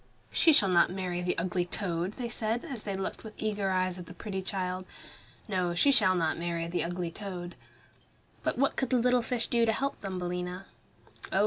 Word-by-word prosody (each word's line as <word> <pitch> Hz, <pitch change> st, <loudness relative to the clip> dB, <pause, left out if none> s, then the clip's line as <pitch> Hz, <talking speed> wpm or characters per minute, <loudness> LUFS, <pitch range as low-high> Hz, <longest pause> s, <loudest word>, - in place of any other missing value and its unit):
"She 330 Hz, -, +5 dB
shall 210 Hz, -9 st, +5 dB
not 175 Hz, -2 st, +5 dB
marry 180 Hz, -1 st, -2 dB
the 180 Hz, 0 st, 0 dB
ugly 180 Hz, +1 st, 0 dB
toad," 175 Hz, 0 st, -2 dB
they 245 Hz, +1 st, -4 dB
said, 230 Hz, 0 st, -1 dB
as 250 Hz, -6 st, -5 dB
they 200 Hz, -2 st, -3 dB
looked 190 Hz, -, -4 dB
with 220 Hz, -1 st, -9 dB
eager 205 Hz, -2 st, 0 dB
eyes 185 Hz, -1 st, +1 dB
at 175 Hz, -, -8 dB
the 180 Hz, -, -10 dB
pretty 190 Hz, -2 st, -4 dB
child. 185 Hz, -1 st, -2 dB, 0.6 s
"No, 180 Hz, -4 st, 0 dB
she 280 Hz, +10 st, +5 dB
shall 185 Hz, -8 st, +5 dB
not 165 Hz, -2 st, +1 dB
marry 170 Hz, -1 st, -1 dB
the 170 Hz, -1 st, -1 dB
ugly 175 Hz, 0 st, -2 dB
toad." 180 Hz, -2 st, -6 dB, 0.9 s
But -, -, -1 dB
what 275 Hz, +2 st, +2 dB
could 265 Hz, -, 0 dB
the 255 Hz, -, +4 dB
little 250 Hz, +1 st, +4 dB
fish 230 Hz, 0 st, -1 dB
do 235 Hz, -1 st, +2 dB
to 225 Hz, -, +4 dB
help 275 Hz, +5 st, -2 dB
Thumbelina? 180 Hz, -1 st, -3 dB, 0.7 s
Oh! 190 Hz, -, +2 dB
185 Hz, 200 wpm, -30 LUFS, 180-220 Hz, 0.9 s, She